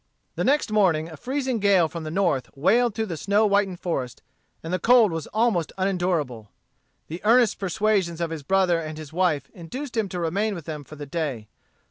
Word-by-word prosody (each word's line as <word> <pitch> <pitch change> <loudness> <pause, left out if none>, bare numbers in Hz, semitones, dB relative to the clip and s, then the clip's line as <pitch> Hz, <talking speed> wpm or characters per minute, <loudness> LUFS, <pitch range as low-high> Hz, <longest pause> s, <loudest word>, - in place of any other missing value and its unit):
The - - -2
next 280 -4 +2
morning 175 -7 +2
a 160 - -9
freezing 260 - -2
gale 195 -5 +4
from 165 0 -7
the - - -4
north 155 -7 0
wailed 225 - +3
through 220 0 -1
the 170 -6 -5
snow 205 +6 +2
whitened 200 -3 +1
forest, 135 -8 -3 0.4
and 165 +2 -4
the 185 - +1
cold 235 -4 +5
was 165 -1 -4
almost 215 -8 +1
unendurable. 175 - -1 0.6
The 165 +3 -7
earnest 230 +1 +4
persuasions 195 -2 0
of 170 -1 -2
his 160 -2 -5
brother 180 +2 +2
and 155 -1 -6
his 155 -1 -9
wife 160 -6 0
induced 245 - -7
him 220 -4 0
to 180 - -4
remain 200 +6 -1
with 170 -4 -8
them 150 -2 -6
for 155 - -12
the 145 -1 -7
day. 140 -9 -4
180 Hz, 195 wpm, -24 LUFS, 160-210 Hz, 0.6 s, cold